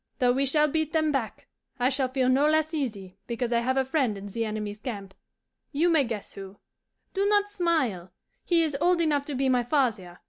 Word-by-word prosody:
Though 250 Hz, -3 st, +3 dB
we 270 Hz, +2 st, +1 dB
shall 300 Hz, +2 st, +3 dB
beat 315 Hz, +1 st, -1 dB
them 315 Hz, -1 st, +2 dB
back, 245 Hz, -7 st, -3 dB, 0.3 s
I 250 Hz, +1 st, +3 dB
shall 265 Hz, -1 st, +1 dB
feel 255 Hz, 0 st, 0 dB
no 270 Hz, +3 st, +4 dB
less 315 Hz, +1 st, +1 dB
easy 200 Hz, -, -4 dB
because 235 Hz, 0 st, -2 dB
I 235 Hz, -, +3 dB
have 260 Hz, +3 st, 0 dB
a 265 Hz, -, +2 dB
friend 260 Hz, -6 st, 0 dB
in 195 Hz, -, -8 dB
the 225 Hz, +3 st, -3 dB
enemy's 210 Hz, -1 st, -4 dB
camp. 200 Hz, -6 st, -6 dB, 0.6 s
You 320 Hz, +4 st, +2 dB
may 305 Hz, -5 st, +4 dB
guess 225 Hz, -3 st, -6 dB
who. 195 Hz, 0 st, -10 dB, 0.6 s
Do 395 Hz, +1 st, +1 dB
not 410 Hz, 0 st, +2 dB
smile. 310 Hz, -, 0 dB, 0.3 s
He 340 Hz, -2 st, +3 dB
is 305 Hz, -3 st, -2 dB
old 355 Hz, 0 st, +3 dB
enough 295 Hz, -4 st, +1 dB
to 290 Hz, -, -4 dB
be 270 Hz, +1 st, +1 dB
my 250 Hz, -1 st, +3 dB
father. 230 Hz, -, 0 dB
265 Hz, 210 wpm, -27 LUFS, 220-310 Hz, 0.6 s, no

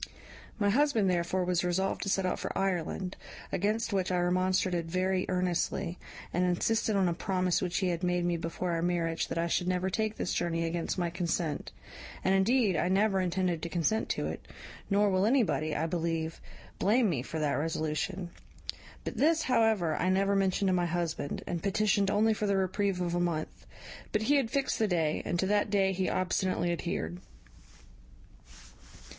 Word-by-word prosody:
My 205 Hz, -2 st, +2 dB
husband 235 Hz, -6 st, +3 dB
therefore 180 Hz, +1 st, 0 dB
was 180 Hz, -1 st, +1 dB
resolved 185 Hz, +2 st, 0 dB
to 195 Hz, -, -2 dB
set 195 Hz, -1 st, +1 dB
out 185 Hz, -, -1 dB
for -, -, -4 dB
Ireland; 190 Hz, 0 st, -1 dB, 0.4 s
against 215 Hz, +4 st, 0 dB
which 190 Hz, -1 st, 0 dB
I 180 Hz, -, +1 dB
remonstrated 180 Hz, -1 st, +1 dB
very 185 Hz, +1 st, 0 dB
earnestly, 180 Hz, -1 st, -1 dB, 0.3 s
and 180 Hz, -, +1 dB
insisted 215 Hz, +5 st, +1 dB
on 195 Hz, -2 st, +3 dB
a 170 Hz, -, +1 dB
promise 185 Hz, 0 st, 0 dB
which 180 Hz, -1 st, -1 dB
he 185 Hz, -2 st, +1 dB
had 170 Hz, -1 st, -2 dB
made 180 Hz, -1 st, +1 dB
me 175 Hz, 0 st, +1 dB
before 170 Hz, +2 st, -3 dB
our 165 Hz, -1 st, 0 dB
marriage 170 Hz, -1 st, 0 dB
that -, -, -4 dB
I 165 Hz, -, +1 dB
should 175 Hz, +1 st, 0 dB
never 185 Hz, +1 st, 0 dB
take 220 Hz, +2 st, -1 dB
this -, -, -2 dB
journey 165 Hz, -1 st, 0 dB
against 165 Hz, +2 st, -2 dB
my 175 Hz, -2 st, -1 dB
consent; 170 Hz, -3 st, -2 dB, 0.5 s
and 190 Hz, -, +3 dB
indeed 205 Hz, +1 st, +3 dB
I 165 Hz, -, +1 dB
never 195 Hz, 0 st, +3 dB
intended 180 Hz, -2 st, 0 dB
to 170 Hz, -, -4 dB
consent 180 Hz, +6 st, 0 dB
to -, -, -1 dB
it; -, -, -5 dB, 0.5 s
nor 200 Hz, 0 st, +3 dB
will 190 Hz, +2 st, +2 dB
anybody, 215 Hz, -, +1 dB
I 155 Hz, -, 0 dB
believe, 165 Hz, -1 st, -2 dB, 0.4 s
blame 225 Hz, +4 st, +3 dB
me 155 Hz, -10 st, 0 dB
for 160 Hz, +5 st, -6 dB
that 150 Hz, -2 st, 0 dB
resolution; 160 Hz, +5 st, -2 dB, 0.7 s
but -, -, -5 dB
this, 320 Hz, +2 st, +3 dB
however, 220 Hz, -10 st, +2 dB
I 180 Hz, -, 0 dB
never 195 Hz, +1 st, +2 dB
mentioned 195 Hz, 0 st, +2 dB
to -, -, +2 dB
my 175 Hz, -1 st, +1 dB
husband, 170 Hz, -4 st, -2 dB
and 170 Hz, -2 st, -3 dB
petitioned 200 Hz, 0 st, +2 dB
only 215 Hz, +2 st, +3 dB
for 210 Hz, 0 st, -2 dB
the 200 Hz, -1 st, +2 dB
reprieve 190 Hz, 0 st, 0 dB
of 175 Hz, -1 st, -1 dB
a 175 Hz, -, +1 dB
month; 170 Hz, -3 st, -3 dB, 0.4 s
but 215 Hz, -, 0 dB
he 285 Hz, +5 st, +4 dB
had 260 Hz, -5 st, +1 dB
fixed 275 Hz, +1 st, 0 dB
the 220 Hz, -, +3 dB
day, 160 Hz, -5 st, 0 dB
and 175 Hz, -, -1 dB
to 190 Hz, -, +1 dB
that 205 Hz, +1 st, +2 dB
day 195 Hz, -1 st, +2 dB
he 185 Hz, 0 st, 0 dB
obstinately 185 Hz, -1 st, 0 dB
adhered. 90 Hz, -, -3 dB
185 Hz, 185 wpm, -30 LUFS, 170-200 Hz, 0.7 s, he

